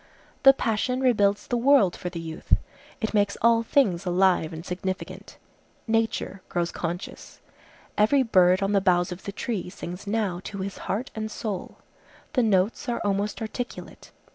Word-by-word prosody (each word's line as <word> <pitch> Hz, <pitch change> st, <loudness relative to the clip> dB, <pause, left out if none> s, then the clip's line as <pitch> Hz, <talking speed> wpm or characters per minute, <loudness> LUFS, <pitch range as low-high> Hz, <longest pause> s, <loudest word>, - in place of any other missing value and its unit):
The 270 Hz, -, +9 dB
passion 250 Hz, 0 st, -1 dB
rebuilds 205 Hz, -6 st, +2 dB
the 245 Hz, -, -1 dB
world 240 Hz, -7 st, +4 dB
for 180 Hz, -, -5 dB
the 170 Hz, -1 st, -6 dB
youth. 160 Hz, -1 st, 0 dB, 0.4 s
It 220 Hz, -, -2 dB
makes 205 Hz, -1 st, +2 dB
all 230 Hz, 0 st, +5 dB
things 215 Hz, -7 st, +2 dB
alive 180 Hz, -3 st, +2 dB
and 165 Hz, +1 st, -8 dB
significant. 185 Hz, +1 st, -5 dB, 0.5 s
Nature 225 Hz, -3 st, -1 dB
grows 175 Hz, -1 st, -1 dB
conscious. 175 Hz, +1 st, -6 dB, 0.6 s
Every 260 Hz, +6 st, +4 dB
bird 185 Hz, -4 st, +4 dB
on 195 Hz, -, 0 dB
the 200 Hz, -1 st, +3 dB
boughs 180 Hz, -1 st, +2 dB
of 180 Hz, +1 st, -8 dB
the 200 Hz, -, -3 dB
tree 205 Hz, -2 st, -4 dB
sings 180 Hz, +1 st, -8 dB
now 200 Hz, -4 st, -1 dB
to 200 Hz, -, -6 dB
his 195 Hz, 0 st, -5 dB
heart 240 Hz, +8 st, -2 dB
and 220 Hz, 0 st, -4 dB
soul. 210 Hz, -3 st, -5 dB, 0.6 s
The 260 Hz, -, +3 dB
notes 215 Hz, +5 st, +1 dB
are 235 Hz, -, -1 dB
almost 205 Hz, +2 st, -1 dB
articulate. 240 Hz, +3 st, -7 dB
200 Hz, 160 wpm, -26 LUFS, 180-225 Hz, 0.6 s, The